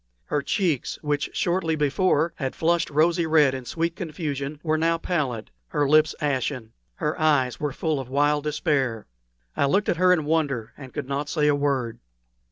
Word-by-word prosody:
Her 145 - -1
cheeks, 170 - -1
which 145 -1 -1
shortly 175 -2 0
before 155 +2 +1
had 135 -3 -3
flushed 170 +1 +1
rosy 165 +3 +2
red 150 -4 +4
in 130 -1 -5
sweet 165 +5 -2
confusion, 150 -5 -4
were 155 -2 +1
now 165 +1 +2
pallid, 140 -10 -2 0.2
her 145 -2 0
lips 155 +1 +4
ashen; 130 -5 -2 0.2
her 150 - -2
eyes 140 -6 +2
were 150 -1 -1
full 155 +1 -1
of 130 - -6
a - - -14
wild 145 +1 +2
despair. 135 -7 0 0.5
I - - +2
looked 195 +9 +1
at - - +1
her 185 +1 +4
in 165 -5 +2
wonder, 145 -8 -1
and 130 -3 -11
could 145 -4 -5
not 140 +2 -2
say 150 -2 +1
a 145 - +4
word. 140 -5 -1
150 Hz, 180 wpm, -24 LUFS, 140-160 Hz, 0.5 s, red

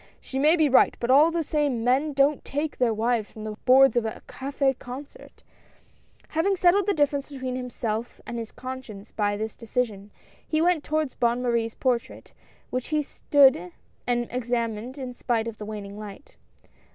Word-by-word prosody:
She 265 - -5
may 305 +4 +5
be 315 -3 +3
right, 265 - +4
but 240 +1 0
all 295 +5 +7
the 335 0 -1
same, 290 -6 0
men 270 +5 +2
don't 275 +1 +2
take 290 +2 -3
their 245 -2 +3
wives 225 0 0
from 215 - -9
the 215 - -4
boards 270 +1 +6
of 240 - +2
a 220 - -5
cafS 275 0 -1
concert! 280 - -10 0.9
Having 330 +5 +1
settled 375 +2 +3
the 405 - +3
difference 285 -2 +1
between 260 -3 -4
himself 235 -2 -4
and 235 0 -5
his 225 -1 -6
conscience 250 -5 -8
by 205 -1 0
this 220 +1 -4
decision, 220 -3 -3 0.4
he 310 - +1
went 340 -2 +2
toward 310 -2 -1
Bonne 240 +1 +1
Marie's 230 -2 0
portrait, 245 -3 -2 0.4
which 255 0 -2
he 305 -1 0
stood 265 - +3 0.3
and 240 -1 0
examined 240 0 -2
in 255 -2 -5
spite 235 -2 -1
of 225 -2 -7
the 210 - -6
waning 205 -1 -7
light. 210 +5 -10
250 Hz, 175 wpm, -25 LUFS, 230-285 Hz, 0.9 s, all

